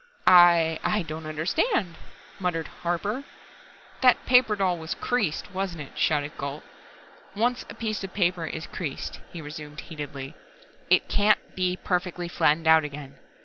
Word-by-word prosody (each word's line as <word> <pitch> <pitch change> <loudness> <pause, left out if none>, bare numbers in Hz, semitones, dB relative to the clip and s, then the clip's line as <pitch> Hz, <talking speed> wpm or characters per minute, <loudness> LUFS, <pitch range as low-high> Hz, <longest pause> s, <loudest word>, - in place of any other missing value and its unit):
"I 170 -3 +6
I 210 -3 +1
don't 160 0 -7
understand," 175 - 0 0.5
murmured 175 -4 -2
Harper. 200 +9 -2 0.8
"That 255 -2 +5
paper 250 -4 +5
doll 185 -4 0
was 160 0 -4
creased, 210 -8 -1
wasn't 185 -4 -3
it?" 145 - -9
shouted 150 -1 +1
Gault. 140 +2 -5 0.7
"Once 240 +4 0
a - - -8
piece 215 -3 -3
of 195 - -6
paper 175 -4 0
is 160 +1 -5
creased," 150 -7 -5
he 165 -3 -8
resumed 150 0 -8
heatedly, 145 -3 -7 0.6
"it - - +4
can't 210 +1 +2
be 185 -1 0
perfectly 180 -1 -2
flattened 165 -1 +2
out 160 0 +6
again. 140 -2 -8
175 Hz, 145 wpm, -26 LUFS, 155-195 Hz, 0.8 s, I